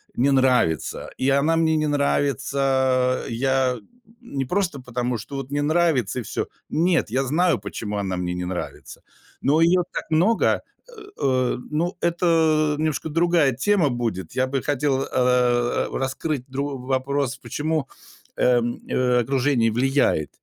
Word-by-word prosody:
не 135 +3 +2
нравится. 125 - +1
И 130 - +1
она 140 +4 +3
мне 160 -1 +2
не 155 0 0
нравится, 135 -2 +1
я 130 +1 +1 0.4
не 140 - -4
просто 180 -1 -1
потому, 125 -1 -2
что 115 +7 -8
вот 135 0 -6
не 145 0 0
нравится 150 - +1
и - - -5
всё. - - -3 0.2
Нет, 170 -4 +1
я 130 +3 +1
знаю, 165 - +1
почему 105 +1 -5
она 95 -2 -2
мне 90 0 -2
не 90 0 -4
нравится. 90 0 -6 0.4
Но 150 +4 +3
её 175 +2 +4
так - - -3
много, 180 +9 +2 0.3
э - - -15 0.3
э, 130 -2 +1
ну, 170 +4 -1
это 160 -3 +2
немножко 155 0 -2
другая 165 -2 +3
тема 165 - +2
будет. 115 -8 -3
Я 130 +1 +1
бы 135 0 -2
хотел, 140 -1 0
э, 125 -1 +1
раскрыть 135 +1 -3
другой 140 +1 -3
вопрос, 135 0 -1
почему, 155 -1 -2 0.5
э, 125 -1 +3 0.3
э, 125 -1 +2
окружение 130 -2 +1
влияет 125 - +1
135 Hz, 145 wpm, -23 LUFS, 125-155 Hz, 0.5 s, её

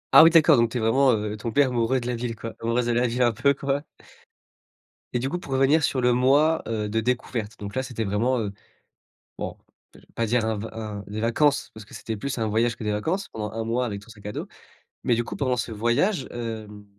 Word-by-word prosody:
Ah - - +12
oui 165 - +8
d'accord, 165 -6 +6
donc 115 0 +3
tu 125 - -3
es - - 0
vraiment, 130 +4 +4
heu, 105 0 -2
tombé 115 +6 +2
amoureux 125 0 +1
de 120 - -7
la 125 - -1
ville 115 -1 -3
quoi, 115 +2 -7
amoureuse 115 +1 +1
de 120 - +1
la 120 +1 +2
ville 120 +2 +1
un 120 - +4
peu 140 +5 +2
quoi. 140 +1 -1 1.3
Et 125 - +1
du 130 +3 -2
coup, 175 - -2
pour 135 -6 -6
revenir 135 +4 +4
sur 130 - +1
le 125 0 +4
mois, 145 +6 +3
heu, 110 -2 -2
de 110 +2 0
découverte, 115 -2 -2
donc 100 -1 -7
là, 130 - 0
c'était 120 -4 -4
vraiment, 115 +6 +1
heu 105 -3 -2 0.9
bon, - - -4 0.4
je - - -14
vais - - -22
pas 115 - 0
dire 115 0 +2
un 110 - 0
v 115 - -5
un 105 -2 -6
des 105 +1 -5
vacances 140 +6 +2
parce 110 - -10
que - - -13
c'était 110 - -4
plus 130 +6 -4
un 115 - 0
voyage 115 +2 +1
que - - -8
des 105 - 0
vacances 160 - -1
pendant 105 -2 -5
1 115 +1 -3
mois 120 +3 0
avec 100 -3 -5
ton 115 - -18
sac 105 -2 -15
à - - -3
dos, - - -5 0.6
mais 120 - +3
du 120 - 0
coup, - - -7
pendant 130 -3 +1
ce 120 - -3
voyage, 125 - +1
hem, 110 -3 -6
120 Hz, 250 wpm, -25 LUFS, 110-130 Hz, 1.3 s, Ah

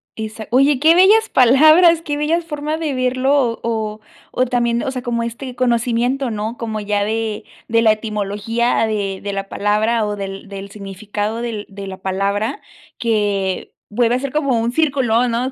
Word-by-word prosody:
Exac 220 0 -6
oye, 275 +2 +4
qué 320 +4 +5
bellas 425 +5 +5
palabras. 310 +7 +6
Qué 295 -3 -3
bellas 320 +3 0
formas 305 0 -3
de 310 -3 -2
verlo 255 +1 +1
o 240 -5 +1
o 220 -2 -3 0.3
o 255 - +1
también, 240 -1 0
o 285 - -2
sea, 255 -1 -4
como 240 -2 -1
este 245 +2 -6
conocimiento, 245 +1 0
¿no? 215 +2 -4
Como 220 -2 -4
ya 205 -1 -1
de 220 0 -2 0.2
de 230 0 +2
la 220 - +6
etimología 215 +2 -1
de 200 -3 -3
de 200 0 -4
la 195 0 -4
palabra 215 +2 +1
o 210 0 -3
del 195 0 -7
del 195 0 -8
significado 205 +2 -5
del 225 -3 -4
de 195 0 -8
la 190 - -7
palabra 200 - -1 0.4
que 205 -5 -1 0.2
vuelve 235 +2 +1
a - - 0
ser 275 0 -4
como 275 -6 +1
un 230 +1 -1
círculo, 255 -6 +2
¿no? 240 +3 -1
230 Hz, 180 wpm, -19 LUFS, 210-260 Hz, 0.4 s, palabras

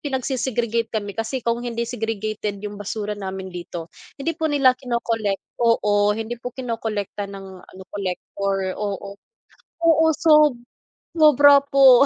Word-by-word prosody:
pinagse-segregate 245 -4 -1
kami 205 -2 -2
kasi 230 +3 -3
kung 235 0 +1
hindi 235 -1 -2
segregated 215 -3 -3
'yung 205 -1 -6
basura 210 +1 -3
namin 190 -1 -5
dito, 175 -1 -7 0.3
hindi 330 +4 -1
po 320 - +1
nila 280 -3 +4
kino-collect 230 -5 -2 0.2
oo, 210 -3 +3
hindi 225 +2 -4
po 250 - -5
kinokolekta 225 -5 -3
ng 195 -1 -9 0.2
ano, 190 - -12
collector, 195 0 -3
oo. 200 -1 -4 0.7
Oo, 320 -1 +5
sob 305 -4 +5 0.6
sobra 285 -2 +7
po. 270 -2 +7
225 Hz, 130 wpm, -22 LUFS, 200-260 Hz, 0.7 s, sobra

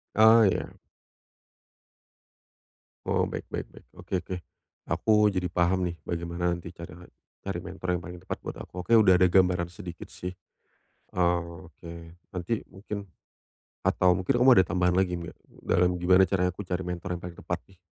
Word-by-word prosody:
Oh 110 +1 +7
ya. 95 - +1 2.3
Oh - - +1
baik - - -5
baik - - -4
baik. - - -17
Oke - - -10
oke. 95 - -5 0.5
Aku 105 -1 +3
jadi 90 -3 -1
paham 90 +1 +2
nih - - -9
bagaimana 85 +1 -2
nanti 85 0 -9
cara 85 0 -11 0.4
cari 95 -3 -3
mentor 90 0 -3
yang - - -12
paling 90 0 -8
tepat - - -4
buat - - -7
aku. 90 - -9
Oke 115 +7 +4
udah 95 -5 +6
ada 90 - +6
gambaran 90 -1 +3
sedikit 85 0 -9
sih, 90 - -6 0.9
eee, 85 -1 +1
oke 85 0 -14 0.5
nanti 100 +6 -1
mungkin 100 0 -7 0.8
atau 90 -1 +3
mungkin 95 +7 0
kamu 130 +2 +7
ada 95 - +6
tambahan 90 0 +2
lagi 90 -2 +1
nggak 85 -1 -8 0.3
dalam 90 0 +2
gimana 90 +2 +5
caranya 90 0 +1
aku 105 - -6
cari 90 0 -3
mentor 90 0 -3
yang - - -20
paling 90 -1 -7
tepat - - -4
nih? 95 - -21
90 Hz, 165 wpm, -27 LUFS, 85-95 Hz, 2.3 s, Oh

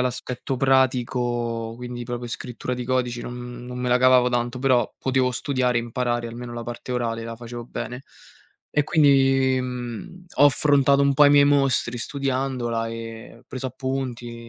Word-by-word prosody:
l'aspetto 125 +1 -3
pratico, 120 -3 +1
quindi 120 0 -6
proprio 120 0 -5
scrittura 125 +1 -5
di 125 0 -5
codici, 125 -1 -1
non 125 0 -7
non 125 0 -7
me 125 0 -1
la 125 - +4
cavavo 130 -1 +5
tanto, 120 0 -1
però 130 -2 +2
potevo 130 -1 +1
studiare 125 -1 0
e - - 0
imparare, 120 0 -2
almeno 120 +1 -7
la 120 0 -5
parte 120 +2 -6
orale 115 -2 -2
la 115 0 -6
facevo 120 0 -8
bene. 125 +1 -6 0.7
E 150 - +2
quindi, 135 -4 +4
mhmm, 125 +7 -6
ho - - +6
affrontato 140 -1 +4
un 140 0 +3
po' 145 +2 +6
i - - +6
miei 145 0 +7
mostri 135 -4 +2
studiandola 130 -3 -2
e 115 +1 -8
preso 130 0 -5
appunti 125 -3 -5
125 Hz, 160 wpm, -24 LUFS, 120-130 Hz, 0.7 s, miei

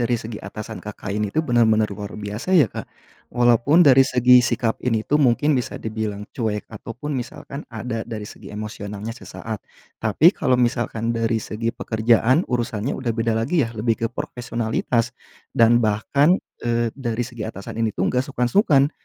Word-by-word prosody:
dari 120 0 +1
segi 110 -1 -7
atasan 105 +2 -7
Kakak 105 -1 -6
ini 105 -1 0
tuh, 155 +10 -1
bener-bener 115 -4 +3
luar 105 0 -7
biasa 105 - -6
ya, 150 - +7
Kak. - - -8 0.4
Walaupun 120 +7 +4
dari 135 0 +8
segi 125 -1 +5
sikap 120 -1 0
ini 115 -3 0
tuh, 150 +1 +2
mungkin 140 +4 +3
bisa 125 - -2
dibilang 110 -2 -4
cuek, 110 -4 -2
ataupun 115 +6 -7
misalkan 135 +3 -6
ada 115 0 -4
dari 110 -2 -5
segi - - -11
emosionalnya 105 0 -6
sesaat. 110 -3 -7 0.4
Tapi, 155 - +5
kalau 130 -1 +2
misalkan 115 -1 0
dari 115 0 +1
segi 115 +1 -3
pekerjaan, 115 +8 +2
urusannya 120 -1 -1
udah 120 -3 -1
beda 115 -1 0
lagi 145 +7 +1
yah, 115 - -2
lebih 115 +2 +1
ke - - +3
profesionalitas, 120 -2 -2 0.4
dan 115 +1 +5
bahkan, 120 - +3 0.3
eee, 120 0 +1
dari 120 -2 -2
segi 120 -3 -6
atasan 110 +1 -7
ini 110 -2 0
tuh, 95 - 0
nggak 125 +1 +1
sungkan-sungkan 140 - +3
115 Hz, 165 wpm, -22 LUFS, 110-125 Hz, 0.4 s, dari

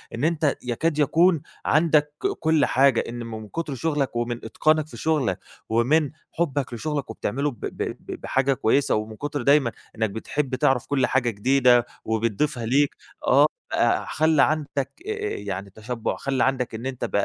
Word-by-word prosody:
إن 120 - -4
أنت 155 -3 +2
يكاد 150 +6 -1
يكون 165 +2 +4 0.2
عندك 150 -1 +3 0.3
كل 160 -1 +3
حاجة، 135 -2 +4
إن 120 +1 -6
من 110 -2 -7
كُتر 155 +2 -4
شغلك 145 -3 -1
ومن 120 0 -2
إتقانك 155 +6 +2
في - - -11
شغلك 145 - 0 0.3
ومن 135 +6 +2 0.2
حُبك 145 -6 -1
لشغلك 145 +2 -3
وبتعمله 135 +6 -2
ب 120 - -15
ب - - -6 0.2
ب - - -8
بحاجة 135 +1 +1
كويسة، 135 +3 +2
ومن 110 +1 -3
كُتر 145 +3 -4
دايمًا 140 -2 +4 0.2
إنك 110 -1 0
بتحب 130 +6 -2
تعرَف 130 -1 +2
كل 135 -3 +1
حاجة 125 -2 +1
جديدة 120 +2 +4 0.2
وبتضيفها 115 +4 -1
ليك 140 +5 +2 0.3
آه - - +6 0.3
بقى - - +2
خلّى 155 -2 +3
عندك 145 -3 -1 0.2
آآ 435 - -1
آآ 425 -1 -3
يعني 100 -1 -5
تشبُّع، 110 +4 -4
خلّى 135 -2 -1
عندك 130 -3 0
إن 115 +3 -6
أنت 130 -2 -3
ب - - -7
135 Hz, 165 wpm, -24 LUFS, 120-150 Hz, 0.3 s, آه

